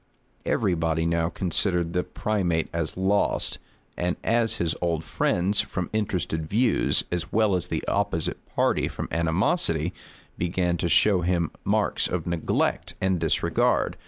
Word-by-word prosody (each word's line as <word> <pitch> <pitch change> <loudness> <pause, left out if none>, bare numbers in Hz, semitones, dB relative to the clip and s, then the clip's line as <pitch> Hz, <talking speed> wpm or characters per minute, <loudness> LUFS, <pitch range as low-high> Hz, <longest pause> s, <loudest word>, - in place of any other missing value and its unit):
Every 100 -5 +1
body 80 -1 0
now 85 0 +1
considered 85 -1 0
the 90 - +2
primate 90 -7 -1
as 85 0 -2
lost; 95 +2 +1 0.4
and 90 0 -1
his 115 -8 +1
old 85 -2 0
friends, 95 +4 +1
from 90 -3 -4
interested 90 -7 -2
views, 120 +3 +3
as 90 -1 -3
well 110 -2 +3
as 90 -1 0
the 80 -2 -3
opposite 100 -5 -1
party - - +2
from - - -5
animosity, 85 - +1 0.5
began 90 0 0
to 85 - -1
show 95 +1 +4
him 85 -2 0
marks - - +1
of 90 -3 -3
neglect 85 -2 -1
and 95 -2 +1
disregard. 80 -1 +1
90 Hz, 135 wpm, -25 LUFS, 85-95 Hz, 0.5 s, show